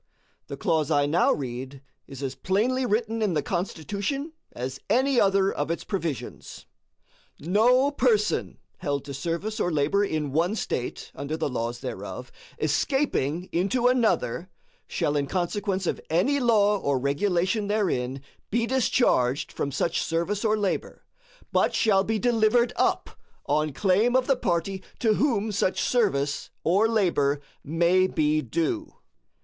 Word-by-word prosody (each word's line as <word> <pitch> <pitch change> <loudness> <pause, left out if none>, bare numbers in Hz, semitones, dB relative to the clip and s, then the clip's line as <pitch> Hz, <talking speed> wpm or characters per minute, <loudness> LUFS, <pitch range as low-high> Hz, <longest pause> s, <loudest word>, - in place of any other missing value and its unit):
The - - -6
clause 155 -2 0
I 145 -2 +3
now 160 +5 +3
read 130 0 -5 0.2
is 135 0 -8
as 135 -1 -2
plainly 245 - 0
written 225 +1 0
in 200 -6 +1
the 150 - 0
Constitution 200 - -3 0.2
as 130 +2 -5
any 260 +3 +3
other 195 -1 +3
of 145 - -2
its 165 - -2
provisions: 170 - -5 0.7
"No 245 - +3
person 235 -6 +1 0.2
held 145 -5 -2
to 140 - -6
service 170 - -3
or 175 - +1
labor 155 +7 +2
in 155 -7 -2
one 170 +8 +1
State, 125 - -4
under 140 +3 -4
the 145 - -2
laws 120 0 -3
thereof, - - -6 0.3
escaping 185 - 0
into 200 +8 0
another, 190 - +1 0.4
shall 145 - -1
in 140 -1 0
consequence 190 +3 -1
of - - -2
any 250 - +2
law 210 -5 +3
or 140 -5 0
regulation 180 - 0
therein 140 -11 -1 0.3
be 230 +2 +1
discharged 230 - +1
from 140 - -3
such 165 +5 0
service 170 +5 -1
or 215 -1 +2
labor, 205 -3 -3 0.5
but - - +2
shall 195 -3 +3
be 220 +2 -1
delivered 235 +1 +2
up - - 0 0.3
on 155 +1 +1
claim 205 - +2
of 260 -1 +3
the 270 - +3
party 190 -3 -1 0.2
to 225 -3 +2
whom 225 -4 +1
such 190 -2 0
service 145 - 0
or 195 +7 +3
labor 170 -10 +1 0.2
may 170 +4 +3
be 155 -3 +1
due." 170 - -2
185 Hz, 145 wpm, -26 LUFS, 145-220 Hz, 0.7 s, I